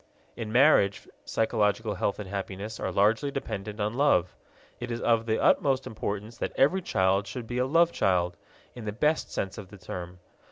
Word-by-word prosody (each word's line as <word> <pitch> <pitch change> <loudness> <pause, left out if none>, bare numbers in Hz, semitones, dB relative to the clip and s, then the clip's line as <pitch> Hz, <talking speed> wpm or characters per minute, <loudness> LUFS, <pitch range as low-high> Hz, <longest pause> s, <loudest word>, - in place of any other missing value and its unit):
In 110 -2 -5
marriage 120 -6 +4 0.2
psychological 110 -1 0
health 100 - -1
and 105 - -6
happiness 100 +2 -5
are - - -2
largely 110 +8 +2
dependent 105 -6 -5
on 105 +1 -1
love. 120 -10 +2 0.4
It 120 - -5
is 120 0 -3
of 115 -1 +2
the 110 - +1
utmost 135 -2 +3
importance 105 +1 -5
that - - -3
every 180 +8 +3
child 95 - +1
should 120 +3 -6
be 120 +2 -3
a 125 - +1
love 165 +4 +4
child, 90 - +1 0.4
in 120 -3 -9
the 105 - -3
best 150 +8 0
sense 95 +2 -3
of 100 - -9
the 100 - -12
term. 90 -1 -7
110 Hz, 185 wpm, -28 LUFS, 100-125 Hz, 0.4 s, marriage